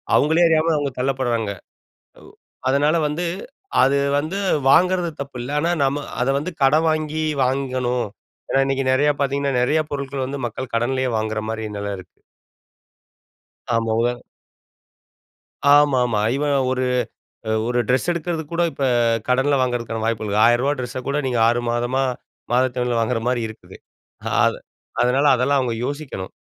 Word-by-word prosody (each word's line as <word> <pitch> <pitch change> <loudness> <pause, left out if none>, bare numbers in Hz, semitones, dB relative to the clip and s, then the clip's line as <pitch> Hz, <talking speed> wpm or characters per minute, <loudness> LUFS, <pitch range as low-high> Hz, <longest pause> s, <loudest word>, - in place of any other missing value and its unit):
அவங்களே 160 +4 +4
அறியாம 160 +1 +3
அவங்க 145 -1 -1
தள்ளப்பட்றாங்க. 125 -5 -1 0.7
அ - - -16 0.5
அதனால 145 +4 +2
வந்து 155 +4 -3 0.6
அது 135 +2 +3 0.2
வந்து 155 +6 -3 0.3
வாங்குறது 180 +2 +3
தப்பு 140 -2 -7
இல்ல, 125 - -6
ஆனா 170 +3 0
நம்ம 140 +1 -1 0.2
அத - - 0
வந்து 150 +6 -4
கடன் 155 +4 +4
வாங்கி 155 0 -2 0.2
வாங்கணும். 125 -2 -1 0.4
ஏன்னா, 135 - +3
இன்னைக்கு 135 0 -1
நெறைய 145 +3 +3
பாத்தீங்கன்னா 140 0 0
நெறைய 150 +6 +2
பொருட்கள் 140 -1 -3
வந்து 140 +1 -5
மக்கள் 120 +1 -6
கடன்லேயே 130 +2 0
வாங்குற 110 0 -2
மாரி 110 0 -4
நில 100 0 -3
இருக்கு. 90 - -15 1.6
ஆமா. 115 -1 0
உதா 120 +1 +1 1.6
ஆமா, 145 -2 +5
ஆமா. 110 -4 0
ஈவன் 145 0 0 0.2
ஒரு 130 0 0 0.7
அ - - +1 0.2
ஒரு 120 0 0
ட்ரெஸ் 130 +5 +1
எடுக்குறதுக்கு 165 -2 -4
கூட 170 +1 +1
இப்ப 140 - -2 0.4
கடன்ல 135 +3 +2
வாங்குறதுக்கான 120 -3 -2
வாய்ப்புள்ளது. 110 -2 -1
ஆயிரவா 120 +4 +3
ட்ரெஸ்ஸ 125 0 -4
கூட 140 +1 0
நீங்க 125 -3 0
6 120 +1 +2
மாதமா 120 +3 0 0.5
மாதத்தவணைல 125 -1 +1
வாங்குற 115 +1 0
மாதிரி 125 -1 +1
இருக்கு. 110 - -12 0.7
அத் - - +1 0.4
அதனால 125 +4 +2
அதெல்லாம் 135 +3 +2
அவங்க 125 -3 -1
யோசிக்கணும். 140 -10 -5
130 Hz, 140 wpm, -21 LUFS, 120-145 Hz, 1.6 s, ஆமா